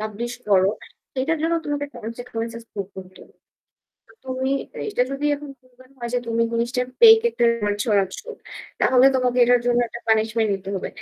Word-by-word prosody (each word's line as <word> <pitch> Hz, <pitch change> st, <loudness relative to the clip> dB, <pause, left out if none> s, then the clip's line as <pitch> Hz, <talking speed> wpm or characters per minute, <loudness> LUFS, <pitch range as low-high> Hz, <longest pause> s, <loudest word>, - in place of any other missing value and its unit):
Publish 215 Hz, +3 st, -4 dB, 0.2 s
করো। 190 Hz, -1 st, +4 dB, 0.4 s
সেইটার 285 Hz, +5 st, 0 dB
জন্য 330 Hz, +1 st, +1 dB
তোমাকে 290 Hz, -1 st, -2 dB
consequences 230 Hz, 0 st, -6 dB
পড়তে 195 Hz, -1 st, -6 dB
হতো। 185 Hz, 0 st, -18 dB, 0.9 s
তো -, -, -21 dB
তুমি 260 Hz, 0 st, -2 dB, 0.4 s
এইটা 415 Hz, -12 st, 0 dB
যদি 275 Hz, +1 st, -4 dB
এখন 290 Hz, 0 st, -9 dB
ফুন 255 Hz, +1 st, -28 dB
ব্যানও 255 Hz, +1 st, -20 dB
হয় 235 Hz, 0 st, -4 dB
যে -, -, +3 dB
তুমি 230 Hz, 0 st, +1 dB
জিনিসটার 240 Hz, +2 st, -1 dB
ফেইক 450 Hz, -1 st, +9 dB
একটা 240 Hz, -, 0 dB
রিউমার 210 Hz, -3 st, -1 dB
ছড়াচ্ছ। 200 Hz, -4 st, 0 dB, 0.6 s
তাহলে 255 Hz, 0 st, +5 dB
তোমাকে 250 Hz, -1 st, +1 dB
এটার 245 Hz, 0 st, +4 dB
জন্য 240 Hz, 0 st, +3 dB
একটা 235 Hz, -, -9 dB
পানিশমেন্ট 220 Hz, 0 st, +2 dB
নিতে 195 Hz, 0 st, -6 dB
হবে। 185 Hz, -, -4 dB
240 Hz, 170 wpm, -22 LUFS, 220-260 Hz, 0.9 s, ফেইক